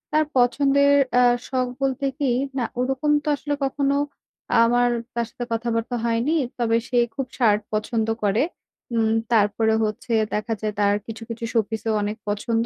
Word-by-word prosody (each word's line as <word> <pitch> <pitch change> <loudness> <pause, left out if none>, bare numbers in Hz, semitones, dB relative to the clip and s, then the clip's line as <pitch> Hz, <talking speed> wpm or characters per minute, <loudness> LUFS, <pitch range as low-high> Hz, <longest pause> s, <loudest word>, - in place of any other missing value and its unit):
তার 310 0 +4
পছন্দের 280 +3 +4 0.2
অ্যা 250 0 +5 0.2
শখ 255 -1 0 0.2
বলতে 270 +1 0
কি, 270 -4 +1 0.3
না 240 - 0
ওরকম 265 +4 0
তো - - -10
আসলে 290 0 -3
কখনো 275 +1 0 0.7
আমার 245 +1 +3 0.3
তার 235 -1 0
সাথে 245 -2 -6
কথাবার্তা 230 +1 -1
হয়নি। 235 +7 +1 0.2
তবে 230 -1 +2
সে 245 - -1 0.2
খুব 270 - -2
shirt 215 -4 +4
পছন্দ 220 +1 -1 0.2
করে। 205 +6 +2 0.5
উম 220 -1 +2 0.2
তারপরে 220 +1 +3
হচ্ছে, 215 +2 -3 0.2
দেখা 215 +2 -1
যায় 215 -1 -2
তার 205 0 +3
কিছু 225 0 -7
কিছু 230 0 -6
showpiece-ও 220 0 0
অনেক 210 +2 -2
পছন্দ 225 +3 0
235 Hz, 155 wpm, -23 LUFS, 220-260 Hz, 0.7 s, অ্যা